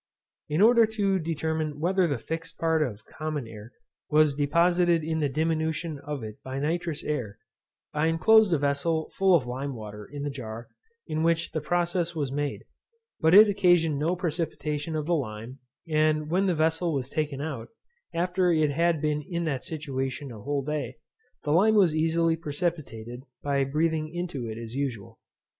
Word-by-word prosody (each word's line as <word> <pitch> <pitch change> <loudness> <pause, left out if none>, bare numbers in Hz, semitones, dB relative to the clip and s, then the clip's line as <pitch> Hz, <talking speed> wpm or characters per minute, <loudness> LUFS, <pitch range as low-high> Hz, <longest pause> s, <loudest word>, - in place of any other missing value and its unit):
In 155 +5 +1
order 230 +1 +6
to 200 -3 0
determine 160 -2 -2
whether 180 +2 +2
the 140 -4 -1
fixed 165 +6 -6
part 160 -1 +1
of 110 -7 -3
common 155 -4 -4
air 110 +1 -11 0.4
was 155 -1 +4
deposited 170 +3 +3
in 160 +1 -1
the 145 -2 +1
diminution 160 +1 -1
of 145 -3 -5
it 110 -1 -8
by 130 0 -6
nitrous 160 +2 -2
air, 120 -9 -3 0.6
I 150 +1 +1
inclosed 215 +5 +5
a 165 - +4
vessel 145 +3 0
full 190 -2 +4
of 145 -7 +2
lime 130 +2 -4
water 105 -2 -9
in 145 -1 -5
the 145 - -2
jar 115 -3 -7 0.4
in 155 -1 -2
which 165 0 +1
the 155 - -2
process 175 +2 0
was 145 -4 -2
made, 145 0 -2 0.6
but 160 +2 +5
it 215 +2 +10
occasioned 175 -7 +3
no 165 +5 +1
precipitation 160 -3 -3
of 155 -1 -2
the 175 - +1
lime; 120 -3 -4 0.3
and 155 -1 +1
when 190 +3 +2
the 180 - +2
vessel 160 +1 +1
was 135 -1 -3
taken 150 -3 -2
out, 140 -6 -4 0.4
after 180 +1 +1
it 155 -3 +3
had 165 +1 +1
been 150 -1 +1
in 170 -1 -2
that 140 -6 -2
situation 135 -3 -4
a 110 -3 -9
whole 140 +3 -2
day, 140 -4 -3 0.5
the 145 - -1
lime 205 +7 +5
was 185 -7 +5
easily 165 +1 +2
precipitated 145 -7 -4 0.2
by 140 -1 +1
breathing 155 +2 0
into 170 -8 -4
it 110 - -6
as 115 0 -7
usual. 130 -7 -4
155 Hz, 175 wpm, -27 LUFS, 140-170 Hz, 0.6 s, it